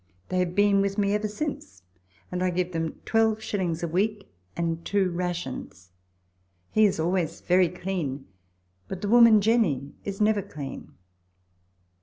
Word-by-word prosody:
They 185 - 0
have 180 -1 -1
been 205 -1 +4
with 200 +1 -1
me 200 -1 +2
ever 210 +1 0
since, 210 - -5 0.5
and 180 0 -2
I 185 - +2
give 180 0 -1
them 165 -1 -2
12s. 215 -6 0
a - - 0
week 200 - -1 0.2
and 165 -1 -2
two 195 -3 +1
rations. 170 - -5 0.8
He 215 - +5
is 190 - -2
always 170 0 -1
very 180 -1 +3
clean; 170 -7 -4 0.6
but 190 -1 -6
the 205 - -1
woman, 230 -2 +7
Jenny, 185 - +1
is 200 -1 -5
never 210 -1 +3
clean. 145 -6 -8
185 Hz, 145 wpm, -26 LUFS, 170-205 Hz, 0.8 s, woman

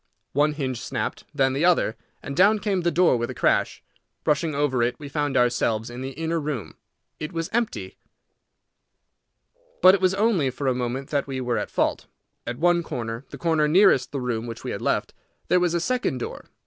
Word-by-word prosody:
One 150 +2 +3
hinge 130 -5 -3
snapped, - - -4
then 135 -3 +2
the 140 +4 -1
other, 175 -10 +3 0.3
and 140 - -5
down 200 +5 +5
came 195 -2 -1
the 170 - +2
door 170 -5 +3
with 120 0 -2
a - - -6
crash. - - +1 0.4
Rushing 150 +1 +1
over 140 -4 +1
it, 120 +1 0
we 145 - -8
found 145 -1 -1
ourselves 120 -2 +1
in 120 +1 -7
the 135 +1 -5
inner 165 +3 -2
room. 145 -7 -4 0.4
It 155 - -5
was 165 -2 -4
empty. 235 -1 -2 1.8
But 185 - +8
it 195 - +1
was 185 0 +3
only 200 - +2
for 140 +2 -5
a 130 - +3
moment 125 +2 -3
that 145 -2 0
we 135 -1 -3
were 120 -3 -1
at - - -4
fault. - - -1 0.4
At 120 - -3
one 175 +2 +3
corner, 115 -4 -5
the - - -9
corner 160 -3 +2
nearest 175 -5 +4
the 140 - -3
room 120 -2 -2
which 115 - -7
we - - -4
had - - -5
left, - - 0 0.4
there 180 - +5
was 175 -1 +1
a - - +2
second 245 - -1
door. 120 - -6
145 Hz, 200 wpm, -24 LUFS, 125-170 Hz, 1.8 s, But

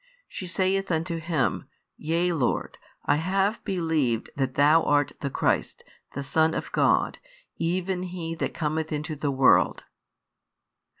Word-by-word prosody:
She 185 - -6
saith 190 +2 0
unto 165 +1 -1
Him. 160 -4 -1 0.3
Yea, 170 +3 0
Lord: 140 -7 -1 0.3
I - - +3
have 195 +6 0
believed 160 - 0
that 135 -2 -1
Thou 150 +3 +5
art 145 -2 +2
the 140 - -2
Christ, - - -1 0.3
the 140 - -4
Son 160 +3 +2
of - - -4
God, - - +2 0.4
even 180 +2 -1
He 175 -2 -5
that 165 - -2
cometh 160 +1 -2
into 150 +1 -3
the 145 0 -2
world. 135 -1 +3
160 Hz, 135 wpm, -26 LUFS, 145-180 Hz, 0.4 s, Thou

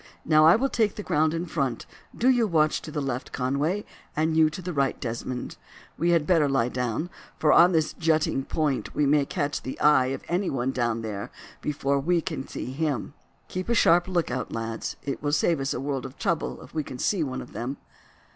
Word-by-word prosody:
Now, 155 0 +6
I 165 - +8
will 260 +5 +2
take 220 -6 +1
the 210 - -6
ground 155 -4 +2
in 165 +2 -2
front; 135 -8 -2 0.3
do 245 - +2
you 245 -4 +4
watch 155 -4 +2
to - - -8
the 150 -1 -2
left, 130 -2 -3
Conway, 145 +10 -1 0.3
and 160 +1 +1
you 160 -1 +5
to 155 - -8
the 180 -1 -5
right, 140 -3 0
Desmond. 120 +1 -4 0.4
We 170 +3 0
had 170 -3 +3
better 160 -5 +3
lie 125 -3 +2
down, 125 +7 -2 0.3
for 150 - +4
on 175 +2 +7
this 160 -3 +1
jutting 155 -4 +1
point 150 -4 -1
we 150 - +2
may 140 0 +3
catch 145 -5 -2
the 130 - -6
eye 140 -4 +5
of 135 - -4
anyone 135 -9 0
down 120 -3 -1
there 105 -2 -5 0.3
before 140 -1 0
we 170 +5 +2
can 155 -5 -4
see - - -5
him. 140 -4 -2 0.3
Keep 185 +4 -5
a 235 - +2
sharp 175 -4 +5
look 175 -3 0
out, 125 -3 -3
lads; 115 0 -4
it 140 -1 -4
will 145 0 -1
save 160 +1 +2
us 135 0 -1
a - - -2
world 135 -1 -3
of 130 - -15
trouble 170 -2 -2
if - - -15
we 155 -1 -1
can 130 - -8
see 180 +5 +1
one 130 -3 -3
of - - -15
them." 125 +4 -4
150 Hz, 215 wpm, -26 LUFS, 130-170 Hz, 0.4 s, I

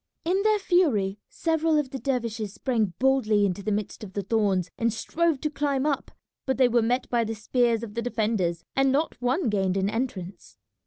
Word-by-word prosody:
In 370 +4 +2
their 430 +1 +3
fury 275 - +2
several 320 -1 +1
of 285 -3 -1
the 270 - -4
dervishes 230 -6 -2
sprang 225 -8 0
boldly 230 -6 +3
into 195 0 -2
the 210 - -2
midst 210 +2 -3
of 190 -3 -9
the 200 - -2
thorns 195 -4 +1
and 230 -1 +1
strove 315 +7 0
to 305 - 0
climb 285 -2 0
up, 290 -3 -1 0.4
but 265 - +1
they 260 -1 +5
were 240 0 +3
met 245 +3 0
by 240 -1 +2
the 225 0 -3
spears 235 +1 +1
of 215 -3 -7
the 235 - -2
defenders, 210 -8 -1
and 270 0 +3
not 290 +1 -1
one 255 +5 +1
gained 195 -3 +1
an 195 +1 0
entrance. 210 -6 -5
235 Hz, 200 wpm, -26 LUFS, 205-270 Hz, 0.4 s, they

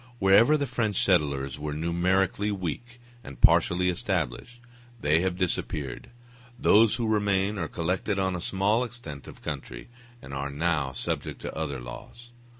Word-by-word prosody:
Wherever 110 +9 +5
the 145 - -1
French 110 -7 0
settlers 70 -7 +1
were 75 0 -4
numerically 90 +5 +1
weak 105 +6 -5 0.2
and 70 -10 -10
partially 90 +8 +4
established, 95 - -2 0.4
they 75 -2 +3
have 90 0 -1
disappeared: 75 -7 -3 0.5
those 110 -1 +5
who 120 -1 -2
remain 100 -1 +1
are 85 - -2
collected 90 +4 -2
on 95 -1 0
a 90 - -4
small 100 +7 +1
extent 115 - -7
of - - -12
country, - - -6 0.3
and 70 - -10
are 70 +1 -3
now 75 -2 0
subject 65 - -4
to - - -6
other 70 -3 -3
laws. 115 - -10
90 Hz, 150 wpm, -27 LUFS, 75-105 Hz, 0.5 s, Wherever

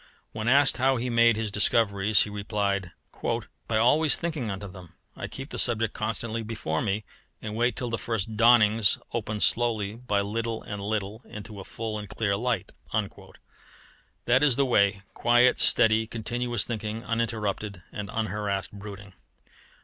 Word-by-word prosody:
When 110 +1 -4
asked 140 +2 +5
how 130 +1 +3
he 125 +1 -2
made 115 -1 +5
his 110 -1 -3
discoveries, 105 -1 +3
he 105 - -7
replied: 100 -2 -1 0.8
"By 110 - +1
always 145 +7 +5
thinking 155 -9 -3
unto 100 +1 -5
them. 90 -2 -13 0.2
I - - -5
keep 135 +2 -8
the - - -3
subject 115 -3 +2
constantly 115 +1 -3
before 105 -8 -3
me, 105 +1 -1 0.4
and 105 -1 -6
wait 120 +2 +1
till 125 -2 -4
the 115 - -2
first 110 -1 -3
dawnings 110 -2 +5 0.2
open 110 -2 -3
slowly 110 -4 +1
by 105 -5 0
little 115 +2 -3
and 105 -1 -6
little 105 +1 -3
into 105 0 -9
a - - -7
full 110 +1 -5
and 105 -2 -8
clear 100 -1 0
light." 115 -2 -2 1.5
That 125 +2 +4
is 145 -5 +4
the 140 - +2
way 100 -5 +2
quiet, 120 +1 +4
steady, 110 0 +4
continuous 120 0 -1
thinking, 110 -1 -4
uninterrupted 105 -5 -2
and 100 -1 -6
unharassed 105 -3 -2
brooding. 100 -1 -10
110 Hz, 155 wpm, -27 LUFS, 100-120 Hz, 1.5 s, asked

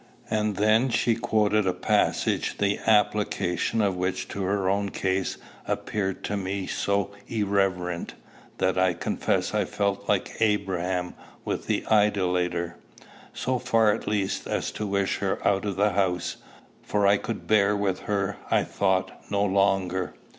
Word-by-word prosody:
And 105 -1 +1
then 110 +5 +3
she 120 0 +2
quoted 105 -2 +1
a 90 - +2
passage - - +1
the 100 0 +1
application 105 -1 +2
of 100 -2 +1
which 90 +1 -2
to 100 - -4
her 95 0 0
own 100 +1 +1
case 95 0 -1 0.3
appeared 95 -3 -2
to 105 - -2
me 95 0 -2
so 100 +1 -1 0.2
irreverent, 95 -5 -1 0.4
that 95 0 +1
I 95 -2 +3
confess - - -1
I - - +2
felt 100 -1 -2
like - - 0
Abraham 95 -4 0 0.3
with - - -3
the - - 0
idolater; 90 -5 +1 0.5
so 130 -1 -1
far 115 -4 +3
at 110 - -5
least 100 -2 -1
as - - -2
to 105 - -4
wish 100 -1 0
her - - 0
out 100 +1 +2
of 100 -2 -2
the 100 +2 +2
house, 90 -2 0 0.4
for 105 -1 0
I 100 +1 +5
could 115 - -5
bear 105 -1 +3
with 100 -2 0
her, 100 -2 0
I - - +3
thought, 95 -1 -1
no 100 0 +1
longer. 95 -2 +1
100 Hz, 150 wpm, -26 LUFS, 95-105 Hz, 0.5 s, I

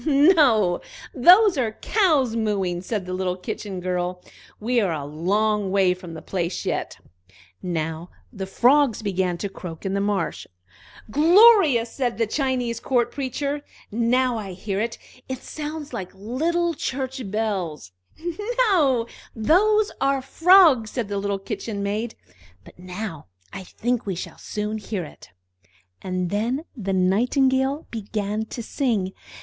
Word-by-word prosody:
"No, 280 - +4 0.3
those 360 - +6
are 225 -4 0
cows 300 - +2
mooing!" 195 -6 -1
said 195 0 -3
the 185 - -5
little 185 -1 -1
Kitchen 190 +1 -5
girl. 180 0 -2 0.4
"We 240 +2 +1
are 195 -4 0
a 150 -3 -3
long 200 +7 0
way 190 -1 +3
from 180 -2 -10
the 160 - -9
place 175 -2 -3
yet." - - -2 0.6
Now 165 -1 -3 0.2
the 195 -3 -5
frogs 250 +3 +3
began 185 -3 0
to 200 - -3
croak 175 -3 -9
in 195 - -1
the 200 - 0
marsh. 200 -3 -2 0.6
"Glorious!" 325 - +6
said 245 -4 -2
the 230 - +2
Chinese 250 -1 -1
Court 240 -2 +1
Preacher. 280 +2 -3 0.3
"Now 240 +2 +1
I 195 -3 -6
hear 195 +2 -3
it 230 0 -3 0.3
it 260 0 -5
sounds 300 -1 -6
just - - -19
like 185 0 -6
little 325 - -1
church 265 -2 -4
bells." 190 - -3 0.8
"No, 270 -10 +3 0.3
those 410 - +3
are 275 -1 +1
frogs!" 325 - +5
said 230 -4 -3
the 200 -1 -2
little 200 0 -1
Kitchen 200 +1 -5
maid. 215 +3 -2 0.5
"But - - -16
now 180 - -6 0.3
I 190 - -6
think 240 +3 -2
we 190 - -1
shall 170 - -7
soon 210 +1 -4
hear 205 -3 -4
it." 150 - -13 0.7
And 185 -1 -2
then 240 +9 -1
the 195 -6 -3
Nightingale 260 +9 +2
began 210 -1 -3
to 235 +2 -7
sing. 220 -7 -1
220 Hz, 145 wpm, -23 LUFS, 190-265 Hz, 0.8 s, those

